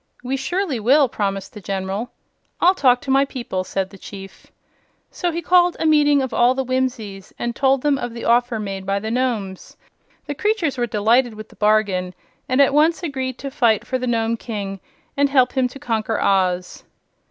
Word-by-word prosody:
"We 255 Hz, +2 st, -2 dB
surely 300 Hz, 0 st, -2 dB
will," 270 Hz, +6 st, +4 dB
promised 195 Hz, -2 st, -3 dB
the 210 Hz, -, -10 dB
General. 195 Hz, +4 st, -3 dB, 0.5 s
"I'll 360 Hz, +2 st, +5 dB
talk 250 Hz, -8 st, +3 dB
to 270 Hz, -, -3 dB
my 270 Hz, +1 st, +5 dB
people," 240 Hz, -9 st, -4 dB
said 190 Hz, 0 st, -3 dB
the 195 Hz, -, -13 dB
Chief. 195 Hz, 0 st, -11 dB, 0.6 s
So 350 Hz, -, -2 dB
he 335 Hz, +1 st, -4 dB
called 355 Hz, -1 st, +4 dB
a -, -, -1 dB
meeting 295 Hz, -3 st, +4 dB
of 260 Hz, -, -4 dB
all 245 Hz, +2 st, +3 dB
the 265 Hz, -, -1 dB
Whimsies 240 Hz, -7 st, -3 dB
and 240 Hz, 0 st, -3 dB
told 270 Hz, -1 st, +2 dB
them 290 Hz, -2 st, +2 dB
of 240 Hz, -, -4 dB
the 235 Hz, -, -6 dB
offer 240 Hz, 0 st, +2 dB
made 195 Hz, -2 st, -5 dB
by 195 Hz, 0 st, +1 dB
the 220 Hz, +2 st, -4 dB
Nomes. 225 Hz, -7 st, -3 dB, 0.5 s
The 290 Hz, -, -4 dB
creatures 375 Hz, -4 st, 0 dB
were 240 Hz, -2 st, -1 dB
delighted 225 Hz, +3 st, +2 dB
with 215 Hz, 0 st, -10 dB
the -, -, -18 dB
bargain, 200 Hz, -3 st, +1 dB, 0.3 s
and 255 Hz, +1 st, +1 dB
at 280 Hz, 0 st, +5 dB
once 320 Hz, +4 st, +3 dB
agreed 260 Hz, -5 st, -3 dB
to 275 Hz, -, -6 dB
fight 230 Hz, -6 st, +2 dB
for 255 Hz, -, -2 dB
the 250 Hz, -, -3 dB
Nome 230 Hz, -1 st, 0 dB
King 200 Hz, -4 st, -5 dB, 0.4 s
and 280 Hz, 0 st, +2 dB
help 255 Hz, -3 st, +3 dB
him 260 Hz, -2 st, +1 dB
to 250 Hz, -, -11 dB
conquer 225 Hz, -5 st, -2 dB
Oz. 185 Hz, -2 st, 0 dB
245 Hz, 195 wpm, -21 LUFS, 205-275 Hz, 0.6 s, I'll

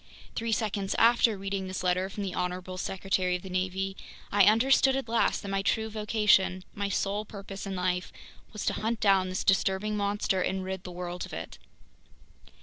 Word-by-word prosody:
Three 230 Hz, 0 st, -2 dB
seconds 205 Hz, -3 st, -1 dB
after 230 Hz, -2 st, +5 dB
reading 195 Hz, 0 st, -3 dB
this 185 Hz, 0 st, -4 dB
letter 185 Hz, +1 st, +1 dB
from 205 Hz, +1 st, -5 dB
the 190 Hz, -2 st, -3 dB
honorable 180 Hz, 0 st, -3 dB
Secretary 185 Hz, -1 st, 0 dB
of 180 Hz, -, -5 dB
the 190 Hz, -, -8 dB
Navy, 190 Hz, +1 st, -1 dB, 0.4 s
I 200 Hz, -1 st, +6 dB
understood 265 Hz, +5 st, +5 dB
at 270 Hz, -3 st, -2 dB
last 230 Hz, 0 st, +1 dB
that 200 Hz, -, -5 dB
my 195 Hz, 0 st, 0 dB
true 220 Hz, +2 st, 0 dB
vocation, 210 Hz, -3 st, +2 dB
my 200 Hz, -1 st, -2 dB
sole 200 Hz, +2 st, -1 dB
purpose 200 Hz, -2 st, -8 dB
in 195 Hz, -, -3 dB
life, 180 Hz, 0 st, -1 dB, 0.4 s
was 210 Hz, -, -5 dB
to -, -, +1 dB
hunt 225 Hz, +1 st, -2 dB
down 195 Hz, -3 st, +3 dB
this 185 Hz, -, -2 dB
disturbing 195 Hz, +2 st, +2 dB
monster 200 Hz, -2 st, 0 dB
and 190 Hz, 0 st, -1 dB
rid 190 Hz, 0 st, -5 dB
the 180 Hz, -, -6 dB
world 175 Hz, 0 st, -5 dB
of -, -, -13 dB
it. 80 Hz, -, -7 dB
195 Hz, 185 wpm, -29 LUFS, 185-210 Hz, 0.4 s, I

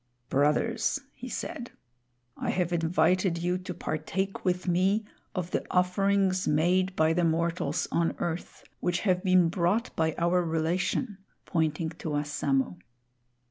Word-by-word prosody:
"Brothers," 220 Hz, -, +2 dB
he 255 Hz, -, -8 dB
said, 265 Hz, -2 st, -5 dB, 0.7 s
"I -, -, -3 dB
have 180 Hz, -1 st, 0 dB
invited 170 Hz, +2 st, +2 dB
you 175 Hz, +2 st, 0 dB
to 180 Hz, 0 st, -6 dB
partake 180 Hz, +4 st, -3 dB
with 180 Hz, 0 st, 0 dB
me 190 Hz, +5 st, +2 dB, 0.3 s
of 180 Hz, -2 st, -3 dB
the -, -, 0 dB
offerings 185 Hz, +1 st, +2 dB
made 185 Hz, +5 st, +2 dB
by 160 Hz, -1 st, +3 dB
the 175 Hz, +1 st, +1 dB
mortals 165 Hz, -2 st, 0 dB
on 170 Hz, 0 st, +1 dB
earth, 170 Hz, 0 st, -4 dB, 0.2 s
which 175 Hz, 0 st, 0 dB
have 185 Hz, -3 st, +1 dB
been 185 Hz, -3 st, +5 dB
brought 185 Hz, +7 st, 0 dB
by 160 Hz, -1 st, +1 dB
our 175 Hz, +1 st, +2 dB
relation," 175 Hz, +6 st, -1 dB, 0.3 s
pointing 160 Hz, -1 st, 0 dB
to -, -, -4 dB
Wassamo. 145 Hz, -9 st, 0 dB
180 Hz, 135 wpm, -28 LUFS, 160-185 Hz, 0.7 s, been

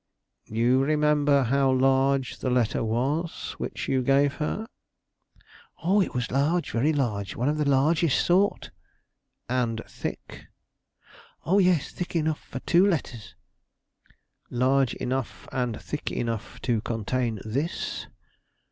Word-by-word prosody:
"You 120 Hz, +4 st, +2 dB
remember 150 Hz, -1 st, +3 dB
how 135 Hz, +2 st, +2 dB
large 135 Hz, 0 st, +2 dB
the 130 Hz, -, -1 dB
letter 125 Hz, -3 st, +1 dB
was 135 Hz, +9 st, -1 dB
which -, -, -4 dB
you 130 Hz, -, +1 dB
gave 140 Hz, +2 st, +3 dB
her?" 215 Hz, +8 st, -2 dB, 1.2 s
"Oh, 195 Hz, +5 st, +3 dB
it 185 Hz, -, -2 dB
was 125 Hz, -1 st, -2 dB
large, 150 Hz, +7 st, +1 dB
very 130 Hz, +7 st, +2 dB
large; 110 Hz, -9 st, -1 dB
one 125 Hz, -, -1 dB
of 150 Hz, +1 st, 0 dB
the 150 Hz, -1 st, +1 dB
largest 150 Hz, +3 st, +3 dB
sort." 190 Hz, +4 st, +2 dB, 0.8 s
"And 120 Hz, -3 st, -1 dB
thick?" -, -, -7 dB, 1.0 s
"O 195 Hz, +4 st, +3 dB
yes; 180 Hz, -6 st, +2 dB
thick 180 Hz, 0 st, -6 dB
enough 155 Hz, -1 st, 0 dB
for 130 Hz, -, -7 dB
two 175 Hz, +2 st, +4 dB
letters." 130 Hz, -, -3 dB, 1.1 s
"Large 130 Hz, +1 st, +2 dB
enough 130 Hz, -1 st, -4 dB
and 125 Hz, -4 st, -2 dB
thick -, -, -4 dB
enough 115 Hz, -2 st, -4 dB
to 115 Hz, -4 st, 0 dB
contain 115 Hz, 0 st, -2 dB
this?" 140 Hz, +10 st, -3 dB
135 Hz, 125 wpm, -26 LUFS, 120-150 Hz, 1.2 s, two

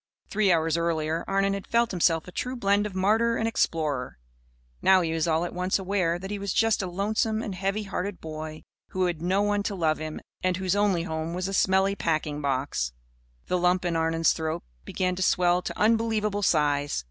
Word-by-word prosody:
Three 205 Hz, -2 st, +2 dB
hours 165 Hz, -1 st, +2 dB
earlier 165 Hz, -1 st, -1 dB
Arnon 195 Hz, 0 st, +1 dB
had 200 Hz, -1 st, -5 dB
felt 235 Hz, 0 st, +2 dB
himself 165 Hz, -3 st, +1 dB
a -, -, -8 dB
true 250 Hz, +8 st, -3 dB
blend 205 Hz, -2 st, +2 dB
of 195 Hz, -, -10 dB
martyr 220 Hz, +5 st, +2 dB
and 225 Hz, -, 0 dB
explorer. 150 Hz, -, -1 dB, 0.6 s
Now 190 Hz, -1 st, +5 dB
he 165 Hz, -2 st, -1 dB
was 165 Hz, 0 st, 0 dB
all 165 Hz, +1 st, +1 dB
at -, -, -6 dB
once 180 Hz, +1 st, 0 dB
aware 185 Hz, -3 st, 0 dB
that 190 Hz, +3 st, -7 dB
he 205 Hz, -, -3 dB
was 200 Hz, -1 st, -2 dB
just 225 Hz, -2 st, +2 dB
a 185 Hz, -, -3 dB
lonesome 215 Hz, +4 st, 0 dB
and 200 Hz, -, -4 dB
heavy 195 Hz, +3 st, -2 dB
hearted 195 Hz, -1 st, -4 dB
boy 155 Hz, 0 st, -7 dB, 0.2 s
who 185 Hz, -1 st, -1 dB
had 170 Hz, -3 st, -2 dB
no 190 Hz, +4 st, +1 dB
one 205 Hz, 0 st, +1 dB
to 200 Hz, 0 st, -3 dB
love 160 Hz, -4 st, +1 dB
him 155 Hz, 0 st, -5 dB, 0.2 s
and 185 Hz, -1 st, +1 dB
whose 185 Hz, 0 st, 0 dB
only 200 Hz, -4 st, +2 dB
home 160 Hz, 0 st, -3 dB
was 180 Hz, +1 st, -2 dB
a 195 Hz, -, -4 dB
smelly 190 Hz, +1 st, +3 dB
packing 155 Hz, -4 st, -1 dB
box. 130 Hz, -, -1 dB, 0.5 s
The 180 Hz, -, 0 dB
lump 180 Hz, +1 st, +2 dB
in 170 Hz, -1 st, 0 dB
Arnon's 165 Hz, 0 st, +2 dB
throat 160 Hz, -1 st, -3 dB, 0.2 s
began 180 Hz, -1 st, -1 dB
to -, -, -3 dB
swell 180 Hz, -1 st, +3 dB
to -, -, -6 dB
unbelievable 215 Hz, -2 st, +2 dB
size. 145 Hz, -, +1 dB
180 Hz, 205 wpm, -26 LUFS, 165-200 Hz, 0.6 s, Now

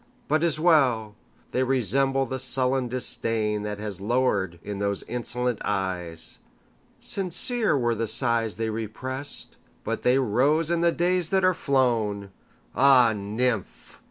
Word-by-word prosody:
But 155 Hz, +2 st, +2 dB
't 170 Hz, -, +3 dB
is 155 Hz, -2 st, -1 dB
well!—they 125 Hz, -8 st, 0 dB
resemble 135 Hz, +2 st, +1 dB
the 130 Hz, +1 st, -4 dB
sullen 130 Hz, 0 st, +2 dB
disdainThat 105 Hz, -4 st, -1 dB
has 105 Hz, -3 st, -5 dB
lowered 100 Hz, -6 st, 0 dB
in 100 Hz, -1 st, -5 dB
those 100 Hz, 0 st, -1 dB
insolent 125 Hz, 0 st, -3 dB
eyes. 90 Hz, -4 st, -2 dB, 0.6 s
Sincere 200 Hz, -, +1 dB
were 120 Hz, -2 st, +1 dB
the 115 Hz, 0 st, -2 dB
sighs 115 Hz, -1 st, 0 dB
they 110 Hz, 0 st, -2 dB
represt, 130 Hz, +6 st, -5 dB, 0.3 s
But -, -, -3 dB
they 125 Hz, +2 st, +3 dB
rose 140 Hz, +7 st, +2 dB
in 170 Hz, -1 st, +1 dB
the 170 Hz, 0 st, +4 dB
days 175 Hz, 0 st, 0 dB
that 190 Hz, -1 st, +2 dB
are 185 Hz, -, +4 dB
flown! 115 Hz, -, 0 dB, 0.4 s
Ah, 130 Hz, -4 st, +5 dB
nymph! 105 Hz, -, -3 dB
125 Hz, 130 wpm, -25 LUFS, 105-135 Hz, 0.6 s, Ah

